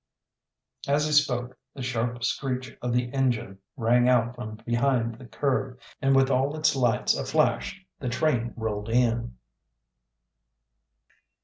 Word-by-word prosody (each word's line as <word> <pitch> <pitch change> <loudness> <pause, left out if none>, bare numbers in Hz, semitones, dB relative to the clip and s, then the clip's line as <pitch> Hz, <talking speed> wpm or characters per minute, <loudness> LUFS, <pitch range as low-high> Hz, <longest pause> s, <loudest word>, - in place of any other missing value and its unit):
As 145 +2 +2
he 155 - -1
spoke 125 -5 +2 0.2
the 135 - -6
sharp 120 -1 -2
screech 130 0 -2
of 125 - -2
the 120 0 0
engine 120 -8 0 0.2
rang 120 +1 +3
out 120 -1 +3
from 120 -3 -7
behind 120 -1 +1
the 125 - -11
curve, 130 +2 -1 0.2
and 135 0 +3
with 135 0 +4
all 135 +3 +1
its 155 -2 +2
lights 120 -4 +2
aflash - - 0 0.2
the 125 - -3
train 120 -2 0
rolled 110 -1 -3
in. 115 - +1
125 Hz, 130 wpm, -26 LUFS, 120-135 Hz, 0.2 s, with